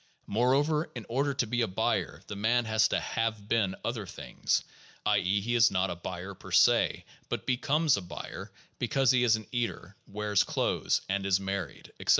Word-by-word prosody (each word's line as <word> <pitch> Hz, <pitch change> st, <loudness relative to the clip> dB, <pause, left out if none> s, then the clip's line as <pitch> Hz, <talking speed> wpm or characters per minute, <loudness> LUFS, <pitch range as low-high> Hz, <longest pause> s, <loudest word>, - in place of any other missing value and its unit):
More 125 Hz, +5 st, +2 dB
over, 150 Hz, +3 st, +1 dB
in 120 Hz, -4 st, -6 dB
order 140 Hz, +4 st, +1 dB
to 130 Hz, -, +1 dB
be 120 Hz, +2 st, -1 dB
a 115 Hz, -, +2 dB
buyer 95 Hz, -, -1 dB
the 105 Hz, -, -7 dB
man 115 Hz, +4 st, +2 dB
has 110 Hz, 0 st, +3 dB
to -, -, 0 dB
have 110 Hz, -3 st, -2 dB
been 105 Hz, -4 st, +1 dB
other 115 Hz, -4 st, -3 dB
things; -, -, -2 dB, 0.4 s
i. 105 Hz, -1 st, +4 dB
e., 100 Hz, +2 st, +1 dB
he 120 Hz, +4 st, -2 dB
is 120 Hz, 0 st, +6 dB
not 95 Hz, 0 st, 0 dB
a -, -, -3 dB
buyer 90 Hz, +2 st, -6 dB
per -, -, -12 dB
se, -, -, +4 dB, 0.2 s
but -, -, -3 dB
becomes 145 Hz, +2 st, +2 dB
a -, -, -3 dB
buyer 85 Hz, -4 st, -8 dB, 0.3 s
because 135 Hz, -3 st, +3 dB
he 125 Hz, -1 st, +3 dB
is 115 Hz, -2 st, +5 dB
an 110 Hz, -1 st, -6 dB
eater, 115 Hz, -5 st, -3 dB
wears 105 Hz, 0 st, +1 dB
clothes, -, -, 0 dB
is 95 Hz, 0 st, +1 dB
married, 95 Hz, -5 st, -5 dB
etc. -, -, -7 dB
110 Hz, 190 wpm, -29 LUFS, 100-120 Hz, 0.4 s, is